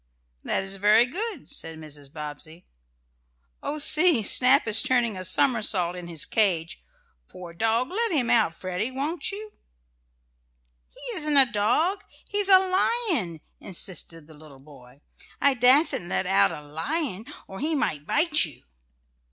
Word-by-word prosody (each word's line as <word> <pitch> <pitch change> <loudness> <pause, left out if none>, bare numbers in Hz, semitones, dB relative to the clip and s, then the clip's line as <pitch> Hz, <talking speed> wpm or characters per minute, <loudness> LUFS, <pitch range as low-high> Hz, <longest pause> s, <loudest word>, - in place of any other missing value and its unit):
"That - - -1
is 195 0 -3
very 210 +4 +4
good," 390 - -5
said 160 -1 -7
Mrs. 145 -3 -11
Bobbsey. 155 +2 -9 1.0
"Oh, 300 - -4
see! 305 -3 +5
Snap 255 +6 +5
is 220 0 +3
turning 240 -4 +1
a 185 - -6
somersault 200 -5 0
in 180 -1 -8
his 165 -3 -1
cage. 170 - -1 0.5
Poor 175 -2 -11
dog, 225 +7 0
let 460 +4 -1
him 270 -8 +1
out, 165 -8 +2
Freddie; 185 +6 -4
won't 285 +9 -3
you?" 425 +1 -9 1.4
"He 465 -7 -5
isn't 300 -1 0
a 270 - +7
dog 310 - 0 0.2
he's 410 -1 0
a 380 - +8
lion," 370 - -1 0.2
insisted 170 -3 -4
the 160 - -15
little 150 -2 -16
boy. 135 -2 -18 0.4
"I 280 -1 +3
dassen't 250 - +3
let 95 - -1
out 100 0 +3
a 150 - -8
lion, 205 - -4 0.2
or 190 - -10
he 310 +4 -1
might 150 - -2
bite 310 0 +3
you." 150 -8 -7
220 Hz, 145 wpm, -25 LUFS, -, 1.4 s, a